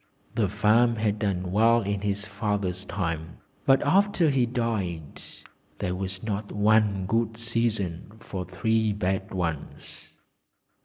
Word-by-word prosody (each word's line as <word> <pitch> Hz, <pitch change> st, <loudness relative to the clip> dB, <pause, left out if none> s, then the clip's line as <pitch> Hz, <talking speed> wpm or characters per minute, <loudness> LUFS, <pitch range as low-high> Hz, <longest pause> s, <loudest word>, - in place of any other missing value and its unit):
The 110 Hz, -4 st, +1 dB
farm 110 Hz, +4 st, +3 dB
had 105 Hz, -1 st, 0 dB
done 95 Hz, -4 st, -1 dB
well 115 Hz, +3 st, +4 dB
in 100 Hz, 0 st, -2 dB
his 100 Hz, 0 st, -1 dB
father's 100 Hz, -2 st, -2 dB
lifetime, 85 Hz, -3 st, -3 dB, 0.3 s
but 135 Hz, 0 st, +5 dB
after 185 Hz, -1 st, +3 dB
he 130 Hz, -3 st, +2 dB
died 100 Hz, -, -3 dB, 0.6 s
there 90 Hz, -, -2 dB
was 95 Hz, 0 st, -4 dB
not 105 Hz, -1 st, -3 dB
one 105 Hz, -2 st, +3 dB
good 115 Hz, +2 st, 0 dB
season 110 Hz, -6 st, -1 dB
for 95 Hz, -5 st, -5 dB
three 110 Hz, +4 st, 0 dB
bad 95 Hz, -1 st, -2 dB
ones. 85 Hz, -5 st, -5 dB
105 Hz, 125 wpm, -26 LUFS, 95-115 Hz, 0.6 s, but